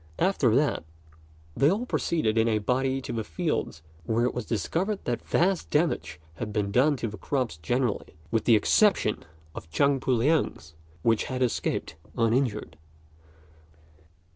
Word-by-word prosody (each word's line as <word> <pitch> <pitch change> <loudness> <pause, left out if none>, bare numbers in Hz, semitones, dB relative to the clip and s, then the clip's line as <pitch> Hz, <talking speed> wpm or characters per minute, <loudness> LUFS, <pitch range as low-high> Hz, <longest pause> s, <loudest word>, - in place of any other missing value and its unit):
After 145 - +2
that, 145 - +1 0.7
they 140 - +4
all 210 +7 0
proceeded 155 - 0
in 115 0 +3
a 110 -2 +2
body 130 +5 0
to - - -6
the 115 -1 -2
fields, 80 -2 -3 0.2
where 115 +6 +1
it 125 - 0
was 120 -3 -5
discovered 175 - -1
that 120 -1 -1
vast 185 +1 +1
damage 150 - 0 0.2
had 105 +3 -4
been 105 -1 -1
done 135 +6 +3
to 120 - -3
the 110 0 -8
crops 130 - -2
generally, 120 - -2 0.2
with 115 -2 0
the 115 - +6
exception 150 - +3 0.3
of 80 - -9
Chang 140 - +2
Pu 130 - -1
liang's, 125 - 0 0.3
which 115 -2 +2
had 130 -2 -1
escaped 120 - -2 0.2
uninjured. 115 -3 0
120 Hz, 150 wpm, -27 LUFS, 110-140 Hz, 0.7 s, the